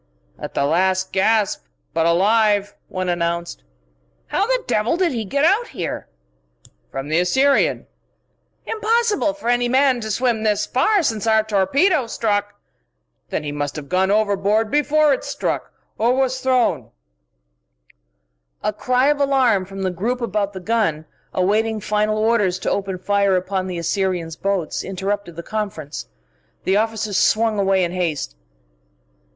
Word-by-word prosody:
"At - - -7
the 140 - +1
last 185 +4 +1
gasp, 210 - +2 0.3
but 165 0 +2
alive," 205 +3 +3
one 185 -1 -4
announced. 170 -1 -2 0.7
"How 405 - +1
the - - 0
devil 220 +9 +1
did 360 -3 +2
he 230 -4 -2
get 280 +9 +1
out 415 +8 +3
here?" 170 - -5 0.8
"From 135 +1 -5
the 160 +2 +2
Assyrian 265 +11 +2 0.4
" - - -46
"Impossible 435 -7 +1
for 295 -5 -8
any 245 0 +2
man 260 -1 +3
to 220 - -5
swim 235 +1 0
this 210 -1 +1
far 385 +9 +2
since 220 -6 -1
our 220 -1 +4
torpedo 240 - +2
struck 205 -2 -1 0.3
" - - -51
"Then - - -2
he 145 - -4
must 145 -1 -3
have 150 -2 -7
gone 185 +1 +2
overboard 210 +1 +1
before 295 0 +3
it - - -3
struck - - -3 0.3
or 235 +3 +3
was 260 -1 0
thrown 255 -2 +1 0.9
" - - -52 0.7
A 210 - 0
cry 250 +4 +1
of 295 -1 +1
alarm 260 -8 +2
from 195 +1 -7
the 185 - 0
group 225 +8 -2
about 205 -3 -1
the 190 - -6
gun, 185 -7 0 0.3
awaiting 215 +4 +1
final 210 +1 0
orders 215 -4 +2
to 185 - -2
open 195 -2 -2
fire 200 +1 +1
upon 185 +1 -1
the 180 -2 -4
Assyrian's 170 -1 -1
boats, 195 -4 -2
interrupted 195 -1 -3
the 170 - -7
conference. 195 -9 -5 0.6
The 190 - +1
officers 220 -2 0
swung 220 -1 +2
away 195 -1 +2
in 170 - -1
haste. 165 - -2
205 Hz, 155 wpm, -21 LUFS, 185-240 Hz, 0.9 s, our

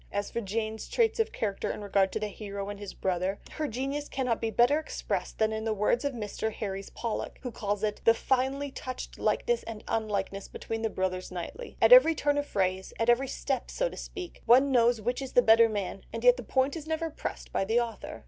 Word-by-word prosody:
As 205 0 -2
for 235 - -2
Jane's 220 +1 -3
traits 460 -1 +2
of 450 0 +1
character 200 -3 -2
in 210 - -4
regard 195 -1 +2
to - - -2
the 210 - -2
hero 200 0 -6
and 205 0 -6
his 205 -2 -6
brother, 185 +1 -1
her 310 -1 -2
genius 275 +4 -3
cannot 250 -4 -1
be 225 - 0
better 245 +7 +4
expressed 315 - -4
than 220 0 +2
in 220 0 -3
the 220 -1 0
words 210 +5 +1
of 285 -1 -1
Mr. 220 -1 -3
Herries 195 -2 -5
Pollock, 230 -2 -4
who 250 - -4
calls 205 -1 -2
it 210 -1 -1
"the 230 - +6
finely 270 +3 0
touched 255 -1 -7
likeness 480 0 +1
and 220 -2 -8
unlikeness 200 -3 -2
between 225 0 -5
the 225 - 0
brothers 185 -2 -2
Knightley. 185 - -7
At - - +7
every 415 -10 +8
turn 290 -1 +1
of 290 - -3
phrase, 190 -3 -1
at 230 +1 +2
every 250 +3 +4
step 265 -1 -2
so - - 0
to - - -10
speak, 365 -4 -7
one 260 +4 +6
knows 240 -2 +4
which 245 +5 -2
is 265 - -6
the 245 - +7
better 225 0 +7
man, 200 -2 -4
and 230 +1 -5
yet 245 0 +7
the 250 - -6
point 260 +5 +1
is 315 -2 -7
never 320 0 -2
pressed - - -6
by - - +1
the 220 +5 +2
author." 235 -2 -4
230 Hz, 225 wpm, -29 LUFS, 205-270 Hz, -, every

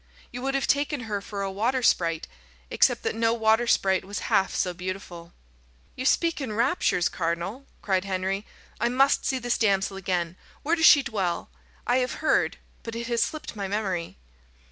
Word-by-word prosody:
You 245 - -6
would 270 +1 -1
have 275 - +1
taken 285 -1 +1
her 210 -3 -3
for 200 0 -5
a 195 - -2
water 240 +6 0
sprite, 165 -6 +2 0.4
except - - +3
that - - -1
no 225 +1 +1
water 225 +1 +3
sprite 190 -4 +2
was 200 +1 -6 0.2
half 190 - +2
so 180 - 0
beautiful." 180 -1 -7 0.6
"You 255 - -5
speak 335 -1 +2
in 245 -6 -3
raptures, 215 - +2
cardinal," 175 +10 -3 0.2
cried 190 -2 +1
Henry. 190 +1 -2 0.4
"I 235 - +1
must 270 +3 +3
see 265 - +1
this 245 -1 -1
damsel 195 -2 +1
again. 180 -2 -2 0.3
Where 320 +4 +2
does 320 -2 +5
she 285 - +8
dwell? 190 - -2 0.3
I 245 - +2
have 255 0 0
heard, 315 - +1 0.2
but 230 0 -7
it 235 0 -4
has 235 -1 +1
slipped 310 -6 -3
my 200 -2 -3
memory." 190 -4 -3
210 Hz, 180 wpm, -26 LUFS, 190-250 Hz, 0.6 s, she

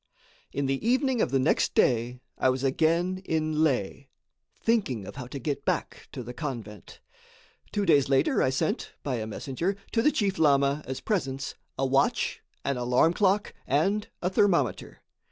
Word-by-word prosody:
In 140 - -2
the 135 0 -1
evening 255 +1 +2
of - - +2
the 135 - +2
next 135 +3 +1
day 120 +1 +2
I 130 - +2
was 130 +1 -1
again 170 +7 +1
in 155 -2 0
Leh 135 -3 0 0.5
thinking 190 - 0
of - - -9
how 125 -3 -6
to 135 - -7
get 140 +2 -3
back - - -2
to 125 - -6
the 125 +2 -7
convent. 115 - -7 0.7
Two 205 -1 0
days 145 -6 +4
later 135 -1 +3
I - - +3
sent, 135 +4 -2
by 130 -4 -1
a 110 -1 -4
messenger, 140 - -3 0.2
to 225 - +2
the 300 - +4
chief 200 -7 0
lama, 140 -1 +3
as 130 0 -4
presents, 135 -10 -2 0.2
a 135 - +1
watch, 135 +1 +1 0.2
an 140 -2 0
alarm 125 +7 +3
clock, 200 +2 +1
and 195 +10 +1 0.2
a 180 - +1
thermometer. 190 -2 +1
140 Hz, 170 wpm, -27 LUFS, 130-185 Hz, 0.7 s, days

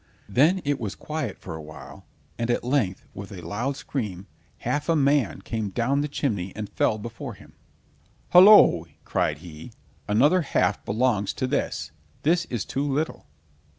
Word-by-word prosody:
Then 155 - +3
it 145 -1 0
was 105 -4 -4
quiet 150 -9 -4
for 85 - -8
a 80 - -7
while, 75 0 -12 0.3
and 115 0 -1
at 120 - +1
length 120 -8 0
with 100 +1 -8
a 90 -3 -8
loud 125 +7 -2
scream, 105 -11 -4 0.4
half 145 +2 -1
a 165 - +4
man 140 -4 +2
came 110 -3 -3
down 125 +7 0
the 150 - -1
chimney 105 -11 -2
and 105 -1 -4
fell 105 +2 0
before 115 +2 -7
him. - - -17 0.8
"Hollo!" 180 - +8 0.2
cried 75 - 0
he, 80 -2 -10 0.4
"another 145 - +4
half 135 -8 0
belongs 105 -2 +1
to - - -2
this. 130 - -2 0.3
This 170 +3 +2
is 120 -4 -4
too 135 - -2
little!" 150 - -2
120 Hz, 160 wpm, -25 LUFS, 100-145 Hz, 0.8 s, Hollo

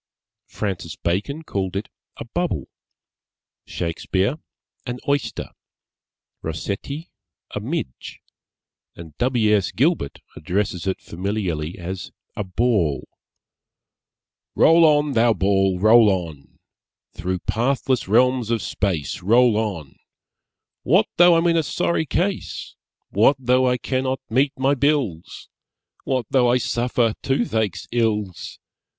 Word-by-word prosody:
Francis 95 -6 -4
Bacon 105 - -2
called 95 - -3
it 100 +3 -3 0.3
a - - -7
Bubble; - - -2 1.0
Shakespeare, 95 - -1 0.5
an 125 0 -3
Oyster; 140 -1 -1 0.9
Rossetti, 100 - -5 0.4
a - - -2
Midge; 65 - -5 0.8
and 80 -3 -11
W. 120 -4 +3
S. 100 -3 0
Gilbert 140 - 0
addresses 90 +1 -2
it 95 - -1
familiarly 90 -4 -3
as 90 0 -6 0.3
a 105 - -2
Ball 95 - 0 1.5
Roll 165 +1 +6
on, 150 -1 +3
thou 115 -2 +4
ball, 95 -1 +2
roll 110 +3 +6
on! 85 -7 -4 0.6
Through 90 +1 -2
pathless 125 - 0
realms 125 +2 +3
of 115 -3 0
Space 90 -8 -2
Roll 115 +4 +4
on! 95 -11 -3 0.8
What - - +3
though 175 0 +7
I'm 165 +1 +2
in 170 -1 +3
a - - +4
sorry 160 +1 -1
case? 185 +6 -2 0.4
What 115 +8 +4
though 130 0 +2
I 125 - +1
cannot 130 +1 -1
meet 135 +4 +2
my 135 +2 +2
bills? 140 - -1 0.6
_What 130 -2 +1
though 125 -3 +4
I 125 - +4
suffer 120 -1 0
toothache's 110 -7 -1
ills? 105 -6 -1
110 Hz, 115 wpm, -22 LUFS, 95-130 Hz, 1.5 s, though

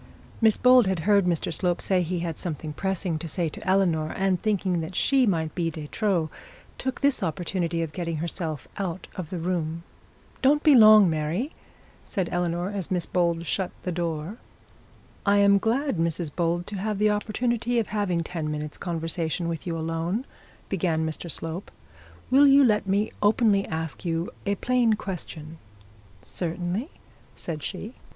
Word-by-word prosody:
Miss 220 -2 +5
Bold 250 -3 +6
had 190 -3 0
heard 200 +2 +4
Mr 170 -2 0
Slope 175 +2 +1
say 185 -2 +1
he 175 0 -2
had 165 -3 -4
something 155 -3 -4
pressing 185 -1 -2
to 165 - -5
say 165 +1 -1
to - - -10
Eleanor, 170 -5 +2
and 190 -2 +1
thinking 190 -5 0
that 165 +3 -6
she 265 +2 +3
might 160 -5 0
be 170 -2 -1
de 155 -2 -7
trop, 180 -7 0 0.5
took 260 0 -3
the 280 -1 +5
opportunity 170 0 -1
of 155 -2 -6
getting 170 -1 -3
herself 160 -2 -4
out 185 -2 -3
of 175 -5 -5
the 185 - -4
room. 170 -1 -2 0.6
'Don't 290 +3 +4
be 300 - +7
long, 215 -4 +8
Mary,' 165 - -1 0.5
said 190 -6 -2
Eleanor, 175 +1 -1
as 195 -4 -4
Miss 180 -3 0
Bold 170 -2 0
shut 190 +1 -1
the 180 - -2
door. 170 +3 -3 0.9
'I 200 0 +5
am 200 0 +6
glad, 250 - 0
Mrs 165 -1 -1
Bold, 175 0 0
to 205 - -5
have 210 +2 -2
the 210 +1 +3
opportunity 235 +3 -1
of 230 - 0
having 190 -5 0
ten 160 -2 -4
minutes' 150 0 -5
conversation 165 -1 -2
with 165 +1 -4
you 165 -1 -2
alone,' 165 +8 -2 0.4
began 165 -4 0
Mr 160 +2 -4
Slope. 165 +4 -3 0.6
'Will 280 +2 +7
you 275 +1 +7
let 210 -5 +2
me 200 +3 +1
openly 205 -1 +3
ask 160 -1 -4
you 165 -1 -2 0.2
a 200 - +2
plain 245 +1 +2
question?' 165 -6 -6 0.6
'Certainly,' 180 - -3 0.5
said 155 -3 -5
she. 205 - -6
180 Hz, 165 wpm, -26 LUFS, 165-205 Hz, 0.9 s, long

